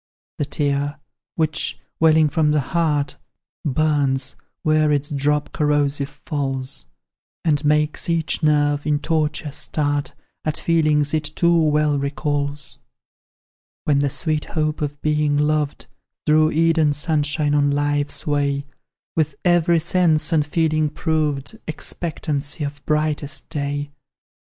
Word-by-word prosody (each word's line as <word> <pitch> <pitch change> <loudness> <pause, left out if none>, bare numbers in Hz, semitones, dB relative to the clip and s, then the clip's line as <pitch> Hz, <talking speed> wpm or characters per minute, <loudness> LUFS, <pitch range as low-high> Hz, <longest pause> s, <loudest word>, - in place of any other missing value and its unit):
"The 145 - +1
tear 145 0 -1 0.4
which, 155 -2 0 0.2
welling 160 -1 +5
from 155 0 +1
the 150 0 +3
heart, 150 -4 +1 0.5
Burns 140 -3 +1 0.3
where 155 -1 +3
its 145 0 0
drop 145 +1 0
corrosive 145 -2 +1
falls, 135 - -3 0.6
And 150 -2 +2
makes 150 +2 +1
each 165 -1 0
nerve, 145 -1 +2
in 150 -1 +3
torture, 155 -1 -1
start, 145 0 -1 0.3
At 155 -1 -1
feelings 155 -3 +2
it 155 -1 0
too 170 0 +3
well 150 -2 +2
recalls: 145 0 -2 1.0
"When 145 -2 +2
the 140 0 +1
sweet 155 +2 0
hope 155 -1 -2
of 145 -1 -3
being 150 -1 +2
loved 150 -1 0 0.4
Threw 155 +1 +4
Eden 160 -2 +3
sunshine 150 0 0
on 145 -1 +3
life's 145 0 0
way: 140 -1 0 0.5
When 155 -3 +2 0.2
every 175 -1 +4
sense 165 -2 +2
and 155 -2 +4
feeling 155 0 +1
proved 155 +3 -1
Expectancy 150 -2 -3
of 145 0 -5
brightest 150 -1 -1
day. 145 -1 -3
150 Hz, 120 wpm, -21 LUFS, 145-155 Hz, 1.0 s, welling